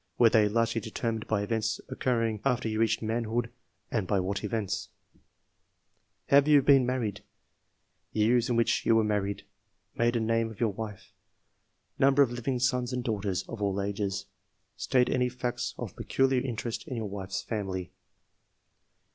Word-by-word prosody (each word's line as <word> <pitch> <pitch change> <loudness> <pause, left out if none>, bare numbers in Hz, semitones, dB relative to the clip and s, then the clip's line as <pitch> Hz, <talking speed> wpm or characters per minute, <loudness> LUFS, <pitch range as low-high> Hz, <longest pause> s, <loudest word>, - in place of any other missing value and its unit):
Were 115 -2 +6
they 105 -2 +4
largely 115 +1 +1
determined 110 +1 -3
by 105 -2 0
events 110 +1 -1
occurring 115 -4 -1
after 125 -4 +1
you 110 0 -2
reached 110 0 +1
manhood, 115 +1 -1 0.4
and 105 -5 -1
by 100 0 +2
what 100 +3 -2
events? 105 -2 -2 1.4
Have 140 +1 +6
you 145 -2 +6
been 135 -3 +5
married? 125 -5 -2 0.9
Year 110 +3 +3
in 120 - +1
which 115 0 +2
you 115 - +4
were 110 - +4
maiTied? 100 -1 -1 0.5
Maiden 120 -1 +1
name 115 0 +1
of 110 - -12
your 110 -4 +1
wife? 105 -1 -7 0.9
Number 140 +1 +6
of 125 - -1
living 120 +2 -2
sons 125 0 0
and 125 -1 -2
daughters 100 -5 -1
(of 115 -3 -7
all 100 -1 0
ages)? 100 -1 -2 0.5
State 125 -1 +2
any 125 -1 +1
facts 125 -1 -3
of - - -6
peculiar 135 -1 +1
interest 120 -2 -4
in 130 - -4
your 115 -2 -3
wife's 95 -1 -4
family. 95 -5 -4
115 Hz, 155 wpm, -29 LUFS, 105-125 Hz, 1.4 s, Were